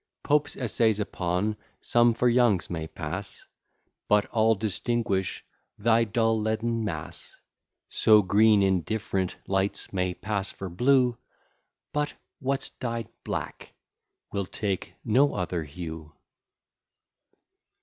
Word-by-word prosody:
Pope's 150 0 +2
essays 115 -3 +2
upon 100 +1 -1 0.2
some 120 -1 +3
for 125 - +2
Young's 120 -8 +3
may 80 -2 -3
pass, 85 +5 -6 0.6
But 105 0 +4
all 110 0 +3
distinguish 105 -1 -1 0.3
thy 115 +2 +3
dull 115 0 +1
leaden 115 +1 -1
mass; 105 - -6 0.5
So 105 -1 +5
green 105 +2 +5
in 95 -2 +3
different 95 -2 -2
lights 95 +1 -1
may 90 -1 0
pass 100 -2 -2
for 95 - -7
blue, 125 +5 +3 0.7
But 150 0 -1 0.2
what's 135 0 -1
dyed 115 -3 -4
black - - -5 0.6
will 100 -2 -2
take 100 -2 -3
no 130 +6 +3
other 90 -3 -2
hue. 80 0 -7
105 Hz, 110 wpm, -27 LUFS, 95-115 Hz, 0.7 s, So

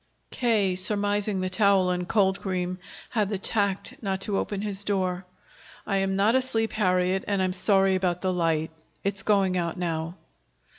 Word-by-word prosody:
K., 215 -7 +1
surmising 205 +1 0
the 185 - -1
towel 195 -1 +3
and 180 0 -2
cold 195 -3 +2
cream, 185 -1 -2 0.3
had 210 -4 +1
the 205 - -1
tact 200 0 -1
not 195 -3 -2
to 200 -1 -1
open 205 -1 -3
his 200 -1 -3
door. 185 -3 -1 0.6
"I 195 - 0
am 195 0 0
not 205 +4 +3
asleep, 250 -4 0
Harriet, 185 -2 +1
and 200 -1 0
I 190 - +2
am 185 - -1
sorry 195 0 +3
about 180 -2 0
the 185 -1 0
light. 165 -2 0 0.3
It's 200 0 -1
going 195 -3 +2
out 170 0 -2
now." 165 -1 -2
195 Hz, 175 wpm, -26 LUFS, 185-205 Hz, 0.6 s, towel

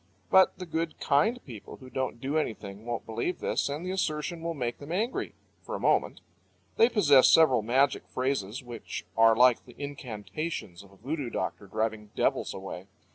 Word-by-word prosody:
But 190 0 +6
the 180 - -6
good, 165 -1 -3
kind 155 - +2
people 115 -6 -10
who 130 -1 -13
don't 130 -2 -2
do 135 +4 -3
anything 110 -8 -3
won't 120 -1 -3
believe 115 +11 -2
this, - - -1
and 150 +5 -4
the 185 - -2
assertion 165 -2 -2
will 165 0 -3
make 120 -4 -3
them 145 +2 -9
angry 220 +8 -2 0.3
for - - -6
a - - -4
moment. - - +1 0.5
They 230 - +5
possess 145 - +6
several 155 -8 +6
magic 130 +5 +2
phrases, 130 -3 -2
which 120 -7 -7
are 115 0 +6
like 125 0 +5
the - - -15
incantations 135 - -5
of 100 -1 -17
a - - -18
voodoo 140 +4 -3
doctor 100 - -4
driving 110 +1 -2
devils - - +1
away. 95 -1 -7
130 Hz, 180 wpm, -28 LUFS, 110-160 Hz, 0.5 s, But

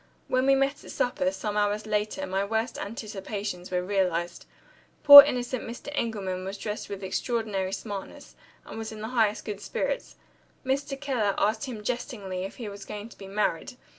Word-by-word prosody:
When 255 +1 +1
we 275 - +6
met 275 +1 0
at - - -12
supper, 215 -7 0
some 200 +2 -4
hours 210 0 0
later, 215 +6 -1
my 190 +1 -1
worst 220 +3 -2
anticipations 200 -3 -5
were 180 -1 -1
realized. 180 -3 -1 0.6
Poor 285 0 +14
innocent 250 -3 -2
Mr. 240 +4 -8
Engelman 200 -8 -2
was 195 +2 -5
dressed 210 +1 -5
with 200 -1 -6
extraordinary 200 -1 -2
smartness, 200 -1 -7 0.3
and - - -8
was 225 0 -5
in 215 -1 -8
the 220 - -4
highest 220 -4 +1
good 205 -2 -5
spirits. - - -3 0.5
Mr. 275 +1 -1
Keller 245 -8 0
asked 215 +5 +1
him 230 -5 -7
jestingly 205 -6 -4
if 195 - -8
he 235 - -7
was 200 -1 -8
going 210 +1 -7
to - - -16
be 195 - -9
married. 200 +3 -1
210 Hz, 175 wpm, -27 LUFS, 195-245 Hz, 0.6 s, Poor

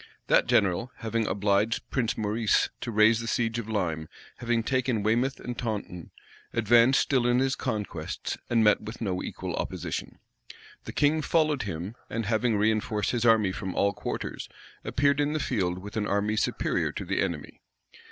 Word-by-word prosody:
That - - +3
general, 100 +6 +2
having 115 -1 -1
obliged 100 +3 +1
Prince 120 -4 0
Maurice 110 +1 +1
to - - -5
raise 110 +1 +4
the 115 - -5
siege 115 0 0
of 110 -1 -6
Lyme, 80 -7 -2 0.3
having 120 -1 0
taken 125 -4 0
Weymouth 120 +5 +1
and 125 - -5
Taunton, 105 -8 -4 0.4
advanced 120 +3 +5
still 130 -3 +1
in 120 0 +3
his 130 0 +1
conquests, 110 -6 -4
and 115 -2 +3
met 105 -1 +4
with 110 +2 -8
no 95 -5 -2
equal - - -5
opposition. - - -4 0.7
The - - -5
king 150 +2 +2
followed 155 -2 +2
him, 95 0 -5 0.2
and 115 -1 -2
having 115 +2 +1
reënforced 110 0 +1
his 120 -1 0
army 110 -4 +4
from 95 -1 -5
all 100 0 +2
quarters, - - -5 0.3
appeared 140 +1 +2
in 145 +1 +1
the 155 - 0
field 95 -10 -1
with 100 +2 -9
an 105 -2 -1
army 105 +2 0
superior 110 - 0
to - - -5
the - - 0
enemy. - - -4
110 Hz, 170 wpm, -27 LUFS, 105-120 Hz, 0.7 s, advanced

